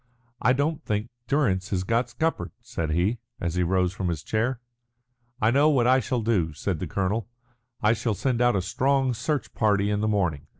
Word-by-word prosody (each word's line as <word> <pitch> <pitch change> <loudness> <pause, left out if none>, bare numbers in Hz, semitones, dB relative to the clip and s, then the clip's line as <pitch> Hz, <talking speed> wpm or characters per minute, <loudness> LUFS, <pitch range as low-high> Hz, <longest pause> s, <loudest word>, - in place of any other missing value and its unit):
"I 125 - +4
don't 145 +3 -1
think 105 +2 -2 0.2
Durrance 105 -10 +1
has 95 -2 -1
got 115 +4 0
scuppered," 160 +6 -1
said 115 -10 -4
he, 90 +9 +1 0.2
as 85 -2 -2
he 90 - 0
rose 90 0 +1
from 95 -2 -3
his 80 -4 -2
chair. 115 +3 -1 0.8
"I 110 +1 +3
know 145 +4 +4
what 130 -6 +3
I 130 +1 +5
shall 125 0 -1
do," 95 -9 +1
said - - -3
the - - -3
colonel. 100 +3 -1 0.5
"I 105 +1 +5
shall 115 -1 -1
send 125 0 0
out 120 -2 +4
a 95 - 0
strong 135 +6 +1
search 135 +6 -2
party 105 -2 +2
in 105 0 0
the 110 - +1
morning." 90 -9 0
110 Hz, 200 wpm, -26 LUFS, 95-125 Hz, 0.8 s, I